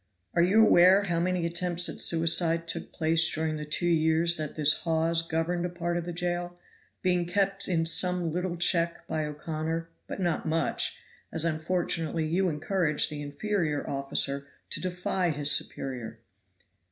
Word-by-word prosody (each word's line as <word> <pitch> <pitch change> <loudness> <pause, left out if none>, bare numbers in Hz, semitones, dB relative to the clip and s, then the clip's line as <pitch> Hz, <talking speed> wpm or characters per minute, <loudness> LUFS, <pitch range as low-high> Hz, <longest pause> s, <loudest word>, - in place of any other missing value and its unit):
Are 170 - +2
you 205 +6 +5
aware 185 +1 +6
how 175 -4 -1
many 180 0 0
attempts 175 +1 0
at - - -3
suicide 165 0 +3
took - - -3
place 160 0 +2
during 155 0 -2
the 150 - -6
two 150 +3 -2
years 165 0 +3
that 155 -2 -4
this 150 -1 +3
Hawes 165 0 +1
governed 165 +1 -2
a 180 - -2
part 175 0 -3
of 175 -1 -3
the 175 - -5
jail, 175 0 -3 0.5
being 180 -2 +1
kept 195 +1 0
in 165 -3 0
some 175 0 +2
little 180 0 -3
check 170 -1 +2
by 155 -1 -2
O'Connor, 160 +2 -4 0.2
but - - -6
not 175 -3 -1
much, 160 0 0 0.3
as 160 0 0
unfortunately 165 0 -1
you 180 +4 +1
encouraged 155 0 0
the 150 -1 -6
inferior 155 +1 -2
officer 140 0 0 0.2
to - - -1
defy 180 0 -1
his 145 -1 +1
superior? 120 -4 -3
165 Hz, 160 wpm, -28 LUFS, 155-175 Hz, 0.5 s, aware